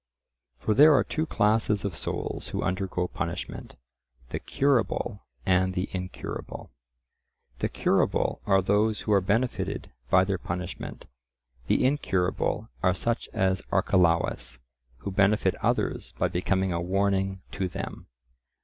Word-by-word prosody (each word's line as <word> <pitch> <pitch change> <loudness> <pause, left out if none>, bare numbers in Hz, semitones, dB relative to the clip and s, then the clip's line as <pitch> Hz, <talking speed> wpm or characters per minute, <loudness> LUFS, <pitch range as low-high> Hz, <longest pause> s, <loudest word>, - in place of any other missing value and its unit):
For 105 +11 0
there 150 +5 +8
are - - +4
two 160 +1 -2
classes 105 -2 +2
of 95 -5 -2
souls - - -3
who - - -3
undergo 90 -1 -1
punishment—the 60 -8 -7
curable 120 -5 0 0.2
and 95 -1 +2
the 90 +1 -1
incurable. 90 -1 -6 0.9
The - - 0
curable - - +1
are 95 -1 +4
those 105 +3 +2
who 105 - +1
are 100 - +5
benefited 110 +7 -1 0.2
by 95 - +6
their 95 -1 -1
punishment; 90 +1 -5 0.6
the - - +3
incurable 95 -10 0
are 90 -1 +3
such 115 +4 -1
as 95 -1 +1
Archelaus, 85 -8 +2 0.4
who 100 - -4
benefit 100 +2 +3
others - - 0
by - - +1
becoming 95 +1 0
a 85 - -1
warning 95 +1 0
to 95 -1 -2
them. - - -6
95 Hz, 125 wpm, -27 LUFS, 90-105 Hz, 0.9 s, there